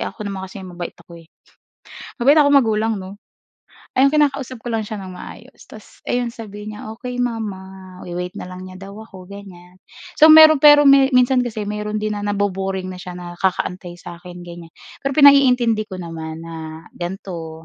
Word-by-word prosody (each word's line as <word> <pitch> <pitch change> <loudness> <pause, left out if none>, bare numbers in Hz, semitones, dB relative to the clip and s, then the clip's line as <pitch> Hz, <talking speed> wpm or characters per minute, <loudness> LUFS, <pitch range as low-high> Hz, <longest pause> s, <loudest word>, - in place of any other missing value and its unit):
ako 210 - -6
naman 195 -1 -5
kasi 190 0 -10
mabait 175 -1 -8
ako, 170 -1 -13
eh, 160 - -21 0.9
mabait 280 +5 +5
akong 285 -2 +5
magulang 220 -2 -1
'no. 190 +2 -10 0.8
Ayun 275 +2 +4
kinakausap 275 -5 0
ko 240 - -7
lang 225 -2 -2
siya 210 0 -6
ng 185 -1 -9
maayos - - -12
tapos - - -16
'yon 245 -1 -1
sabihin 215 -2 -9
niya, 215 +1 -8
"Okey 245 +2 -7
mama" 190 -5 -7
we-wait 180 +1 -6
na - - -6
lang 185 +1 -9
niya 185 - -11
daw 195 +1 -11
ako 190 -4 -12
ganyan. 185 -2 -13 0.4
So 315 - +9
mayro'n 315 -2 +8
pero 295 -1 +7
me 275 -1 +6
minsan 250 +1 +4
kasi 225 -4 -3
mayro'n 210 +1 -4
din 215 0 -2
na 205 - -4
nabo-boring 195 -2 -2
na 180 - -10
siya 180 0 -8
na 175 -1 -8
kakaantay 180 -1 -2
sa 175 0 -11
akin 175 -1 -11
ganyan, 170 -1 -11 0.3
pero 275 -1 -3
pinaiintindi 250 -7 +5
ko 190 - -7
naman 165 -2 -7
na 160 0 -9
gan'to, 175 -3 -7
200 Hz, 180 wpm, -19 LUFS, 180-240 Hz, 0.9 s, So